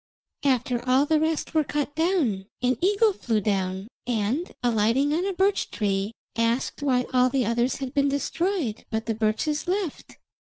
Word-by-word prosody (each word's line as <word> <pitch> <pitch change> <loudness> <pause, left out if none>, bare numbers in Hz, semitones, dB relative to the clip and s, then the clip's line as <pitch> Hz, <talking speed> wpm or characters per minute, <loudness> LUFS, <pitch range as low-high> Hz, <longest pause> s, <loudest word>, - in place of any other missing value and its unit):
After 250 -2 +1
all 265 +3 +5
the 310 +1 +2
rest 315 0 -1
were 315 -1 +3
cut 290 0 -2
down 300 - 0 0.2
an 250 +1 +3
eagle 410 +3 +3
flew 230 - -1
down, 190 -1 -1 0.2
and, 240 - -1
alighting 240 +5 +2
on 350 +5 0
a 395 - -1
birch 385 +2 +1
tree, 200 -1 -1 0.2
asked 230 +5 0
why 255 -3 +2
all 255 0 +4
the 260 -2 +1
others 235 +3 +1
had 270 -1 -5
been 280 0 +2
destroyed, 285 - -1
but 220 0 -2
the 225 - 0
birches 220 +9 -1
left. 370 -4 -3
255 Hz, 165 wpm, -25 LUFS, 225-315 Hz, 0.2 s, all